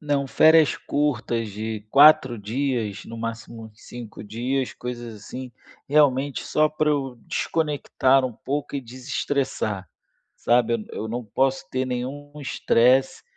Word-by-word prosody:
Não, 145 -2 0
férias 160 +2 +5
curtas 120 -6 -1
de 110 +1 -5
4 140 -4 +6
dias, 110 -2 -2
no 115 - -8
máximo 115 0 -6
5 115 -1 -10
dias, 125 +5 -2
coisas 120 -2 -6
assim, 125 +5 -8 0.4
realmente 140 -2 +2
só 155 0 +2
pra 155 0 0
eu 135 -4 -1
desconectar 135 -4 +1
um 125 - -2
pouco 140 +5 -4
e 140 - -2
desestressar, 125 - -3 0.5
sabe? 120 -2 +1
Eu 110 - -5
não 120 +1 -4
posso 135 +6 0
ter 130 0 -1
nenhum 130 +4 -5
estresse, 130 0 +2
130 Hz, 125 wpm, -24 LUFS, 115-140 Hz, 0.5 s, 4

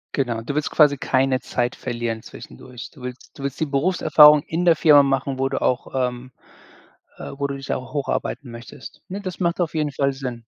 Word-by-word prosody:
Genau. 120 -5 -1
Du 130 +5 -5
willst 150 - -1
quasi 145 -2 +4
keine 130 0 +1
Zeit 125 -1 -2
verlieren 120 -2 -4
zwischendurch. 120 - -11
Du 140 - -17
willst 125 +3 -9
du - - -7
willst 140 -1 -4
die - - +2
Berufserfahrung 150 0 +5
in 170 +2 -2
der 170 -2 +6
Firma 150 -2 +6
machen, 135 -1 -1
wo 135 - +1
du 135 - -3
auch, 125 +1 -1 0.2
ähm, 125 +1 -11 0.9
äh - - -8
wo 140 - -1
du 140 - -5
dich 135 0 -6
auch 130 - -6
hocharbeiten 140 -2 -3
möchtest. 115 +1 -11
Ne, 195 +2 -5
das 185 -3 -6
macht 170 -1 0
auf 170 - -1
jeden 150 -2 -1
Fall 140 0 0
Sinn. 125 -3 -6
135 Hz, 205 wpm, -22 LUFS, 125-150 Hz, 0.9 s, der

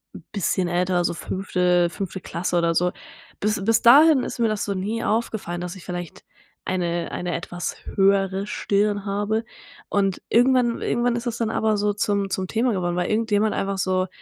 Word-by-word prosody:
'n - - -10
bisschen 185 -2 0
älter, 175 0 +1
so - - 0
5.- 180 -1 0
5. 190 +1 -5
Klasse 175 +1 -2
oder 170 -1 +2
so. 180 +2 +2 0.5
Bis 210 -1 0
bis 225 +2 +3
dahin 285 +3 +7
ist - - -5
mir 230 - +3
das 215 -1 -1
so 200 - -2
nie 210 +5 -2
aufgefallen, 215 -6 -2
dass 180 +1 -5
ich 190 - -12
vielleicht 175 -2 -7 0.4
eine 175 -2 -2
eine 175 -1 -3
etwas 175 +1 -5 0.2
höhere 195 0 +2
Stirn 205 0 0
habe 205 +3 -1 0.4
und 195 -2 0
irgendwann 245 0 +3
irgendwann 240 0 +1
ist 235 - -5
das 235 -1 -2
dann 230 -2 -1
aber 220 -1 +1
so 205 0 +1
zum 200 -1 0
zum 190 -1 -2
Thema 230 +4 +1
geworden, 175 -3 -1
weil 180 - 0
irgendjemand 215 -1 +1
einfach 195 0 -2
so 185 0 +1
195 Hz, 180 wpm, -23 LUFS, 180-220 Hz, 0.5 s, dahin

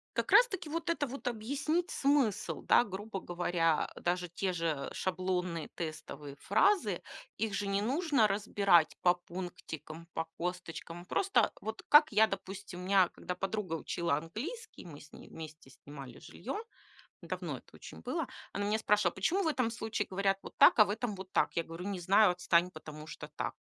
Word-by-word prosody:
Как - - -1
раз - - +8
таки 345 -7 -6
вот 335 +2 -3
это 295 -4 +1
вот 260 0 -7
объяснить 280 +9 -1
смысл, 275 -7 +1
да, - - +6
грубо 205 -1 -5
говоря, 175 -3 +1
э, - - -10
даже 180 0 0
те 185 +3 -1
же 165 -5 -1
шаблонные, 180 -2 -2
тестовые 150 -3 -6
фразы, 355 - +2 0.4
их 220 -2 -1
же 200 0 -1
не 200 0 +1
нужно 275 -1 +2
разбирать 200 -5 +3
по 175 - +5
пунктикам, 170 -2 -8
по 165 - -2
косточкам. 175 -1 -5
Просто, 395 - +2
вот 220 0 -5
как 300 -1 +8
я, 215 +1 +6
допустим, 195 -2 -6
у 180 - -7
меня 190 -2 +5
когда 180 - -6
подруга 195 -2 -3
учила 165 -2 -1
английский, 230 - -7
мы 150 -4 -10
с 150 - -16
ней - - -12
вместе 155 -4 -10
снимали 135 -1 -11
жилье, - - -7 0.7
давно - - -4
это - - -18
очень - - -11
было, 330 -5 -2 0.3
она 205 - -1
меня 210 +2 +1
спрашивала: 210 -5 +2
"Почему 360 - +1
в - - +1
этом 255 -6 +1
случае 220 -2 -2
говорят 195 0 +1
вот - - -11
так, - - +7
а 215 - +9
в - - -7
этом 215 +1 -2
вот 190 0 -9
так?" - - +1
Я 170 - +1
говорю: 165 +3 -8
"Не 195 -3 -3
знаю. 195 +2 +5
Отстань, 175 0 +2
потому 155 -1 -9
что 150 - -8
так". - - -2
190 Hz, 180 wpm, -32 LUFS, 170-220 Hz, 0.7 s, а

